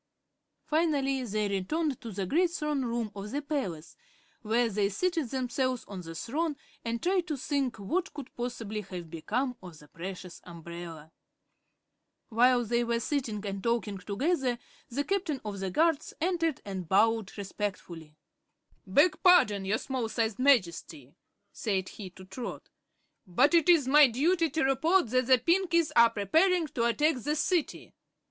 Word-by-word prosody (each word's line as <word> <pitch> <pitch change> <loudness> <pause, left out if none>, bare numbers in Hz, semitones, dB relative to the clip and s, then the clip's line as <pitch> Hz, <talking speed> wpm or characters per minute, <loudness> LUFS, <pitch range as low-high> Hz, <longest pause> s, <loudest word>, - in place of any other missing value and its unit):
Finally 285 -4 +1
they 215 -1 -1
returned 260 - -1
to 230 - -7
the 195 -1 -3
great 340 - +2
throne 300 -5 -2
room 235 -3 -2
of 200 +1 -6
the 280 - -2
palace, 270 - -4 0.5
where 230 +2 +1
they 205 -2 0
seated 330 - -1
themselves 255 0 -1
on 195 -3 -7
the 165 -1 -9
throne 300 - -2 0.3
and 230 0 -3
tried 360 -1 +1
to 300 - -2
think 270 -2 -1
what 340 - -2
could 285 -4 -9
possibly 230 -3 -4
have 180 -4 -8
become 245 - -2
of 175 -4 -11
the 150 - -16
precious 180 +2 -8
umbrella. 170 -2 -9 1.2
While 245 +1 +4
they 235 +2 +1
were 235 0 0
sitting 230 -6 -2
and 195 -1 -4
talking 225 -4 -1
together 255 - -1 0.3
the 275 +4 -1
Captain 360 -6 -1
of 205 -2 -5
the 190 0 -2
Guards 315 - +1
entered 330 -3 0
and 190 -4 -6
bowed 220 +1 +2
respectfully. 185 -6 -6 0.7
"Beg 305 - +3
pardon, 210 - +5
your 205 +3 +1
Small 255 -3 -3
Sized 220 -1 -1
Majesty," 170 - +1 0.4
said 190 -4 -2
he 195 -3 -9
to 185 +1 -14
Trot, 235 +6 -7 0.6
"but 255 - +3
it 340 0 +4
is 320 -7 +5
my 290 +1 +7
duty 325 +8 +1
to 315 +3 -1
report 270 +3 +2
that 255 -1 +2
the 260 -1 +6
Pinkies 335 +3 +2
are 235 0 +7
preparing 325 - +2
to 235 -2 -1
attack 295 +5 +2
the 295 +5 -1
City." 325 +1 -1
240 Hz, 155 wpm, -29 LUFS, 200-300 Hz, 1.2 s, my